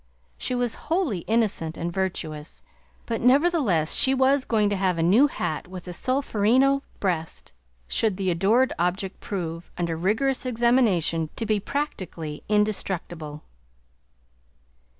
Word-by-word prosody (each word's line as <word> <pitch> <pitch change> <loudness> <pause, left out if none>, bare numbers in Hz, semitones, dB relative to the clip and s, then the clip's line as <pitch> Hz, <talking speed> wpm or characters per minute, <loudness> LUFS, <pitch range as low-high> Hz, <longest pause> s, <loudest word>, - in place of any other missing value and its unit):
She 250 - -3
was 245 -2 0 0.2
wholly 320 - +1
innocent 210 -8 0
and 170 +1 -3
virtuous, 160 -5 -4 0.4
but 230 -1 -3
nevertheless 255 - +3
she 265 0 +5
was 265 +1 +3
going 215 -3 +2
to - - +1
have 185 -2 0
a 165 - +1
new 215 - +5
hat 160 - -4
with 185 -1 -8
the 180 - -7
solferino 260 +3 +2 0.2
breast, 170 -5 -3 0.3
should 210 - +1
the 190 -2 0
adored 215 +10 +2
object 185 +2 -1
prove, 170 -4 -5
under 170 -2 -1
rigorous 220 +10 0
examination, 225 -10 +2
to 225 - -3
be 215 -1 +1
practically 185 - -4
indestructible. 175 -7 -1
200 Hz, 130 wpm, -25 LUFS, 170-250 Hz, 0.4 s, she